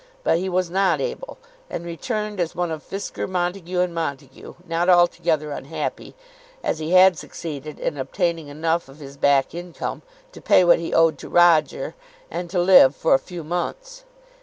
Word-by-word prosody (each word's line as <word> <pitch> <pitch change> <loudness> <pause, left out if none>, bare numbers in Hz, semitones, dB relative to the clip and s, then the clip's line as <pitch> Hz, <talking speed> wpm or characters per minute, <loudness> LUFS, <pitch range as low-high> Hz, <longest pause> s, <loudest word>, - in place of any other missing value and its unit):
But 165 - +2
he 190 +1 -2
was 180 -1 -1
not 195 +1 +2
able, - - -5 0.3
and 170 - -5
returned 210 +4 -4
as 170 -2 -2
one 175 -2 -1
of 155 -1 -5
Fisker, 195 +5 -5
Montague, 180 0 -2
and 180 -1 -1
Montague, 140 -5 -6
not 170 +2 0
altogether 170 -3 +3
unhappy, - - -5 0.5
as - - -1
he 160 +3 -3
had 185 -2 +6
succeeded 150 -2 -8
in 145 - -3
obtaining 165 +3 -2
enough 160 +2 -2
of 135 - -14
his 140 -2 -11
back 140 -1 +2
income 175 0 -6 0.3
to - - -13
pay - - +5
what 175 - +5
he 165 - -5
owed 165 -1 +3
to - - -9
Roger, 175 - +3 0.4
and 175 -1 -4
to 180 0 -1
live 175 -7 +6
for - - +2
a 135 - +5
few 175 -3 -8
months. - - -5
170 Hz, 175 wpm, -22 LUFS, 155-185 Hz, 0.5 s, had